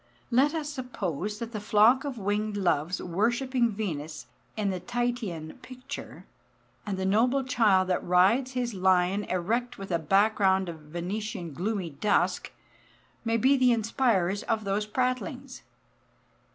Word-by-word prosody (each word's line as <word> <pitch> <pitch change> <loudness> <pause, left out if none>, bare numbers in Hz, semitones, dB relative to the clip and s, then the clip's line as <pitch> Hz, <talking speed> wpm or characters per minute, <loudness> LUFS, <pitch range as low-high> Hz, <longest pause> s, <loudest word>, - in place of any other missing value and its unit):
Let 275 +6 +3
us 310 -2 -2
suppose 210 - -4
that 230 +1 -6
the 215 - -4
flock 220 +5 +4
of 275 -4 -4
winged 205 +1 -1
Loves 175 -2 0
worshipping 235 +7 0
Venus 165 -8 -5 0.3
in 205 -2 0
the 185 - -3
Titian 240 -9 -3
picture, 255 0 -9 0.6
and 195 -2 -2
the 190 - -2
noble 245 +7 +2
child 210 -7 +3
that 180 - 0
rides 205 +9 +3
his 245 -2 -2
lion 185 +1 +2
erect 225 +7 -1
with 195 -1 -7
a 170 - +1
background 190 +1 +2
of 165 -2 -7
Venetian 175 +3 -5
gloomy 185 +1 -2
dusk, 145 +9 0 0.7
may 230 0 +1
be 265 +5 +4
the 255 -2 +4
inspirers 220 -5 +1
of 225 -2 -1
those 200 +1 -1
prattlings. 255 +3 -2
210 Hz, 140 wpm, -28 LUFS, 185-245 Hz, 0.7 s, flock